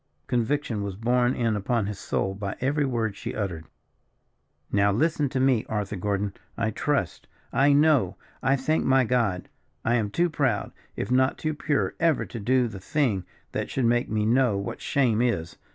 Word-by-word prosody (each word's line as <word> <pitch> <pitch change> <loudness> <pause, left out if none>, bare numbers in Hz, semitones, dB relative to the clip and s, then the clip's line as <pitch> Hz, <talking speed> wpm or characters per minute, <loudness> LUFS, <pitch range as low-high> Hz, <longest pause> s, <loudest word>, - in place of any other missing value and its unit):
Conviction 120 - 0
was 100 -2 -4
borne 120 +4 +2
in 115 -3 +1
upon 105 +2 0
his 105 -1 -5
soul 95 - -1
by 100 0 -4
every 140 +3 +1
word 115 -5 -1
she - - -6
uttered. 90 -7 -3 1.1
"Now 100 0 +3
listen 150 +5 +1
to 130 - -2
me, 130 -4 +3
Arthur 105 -2 -2
Gordon. 100 +1 -1 0.2
I 115 -1 0
trust, 140 - -1 0.3
I 140 +2 +4
know, 140 - +4 0.3
I 135 +2 +3
thank 150 +4 0
my 130 0 +4
God! 110 -7 0 0.4
I 120 - +2
am 105 -3 -1
too 170 +12 +2
proud, 130 -9 0 0.2
if - - -4
not 130 +1 +3
too 155 0 -2
pure, 140 -10 0
ever 165 -3 +2
to 120 - -7
do 125 +3 +2
the 105 -4 -8
thing 105 - 0 0.3
that - - -3
should 130 - 0
make 120 +1 +2
me 105 -1 0
know 120 -2 +3
what 100 - -5
shame 120 -5 +2
is. 85 -10 -1
120 Hz, 180 wpm, -26 LUFS, 100-135 Hz, 1.1 s, I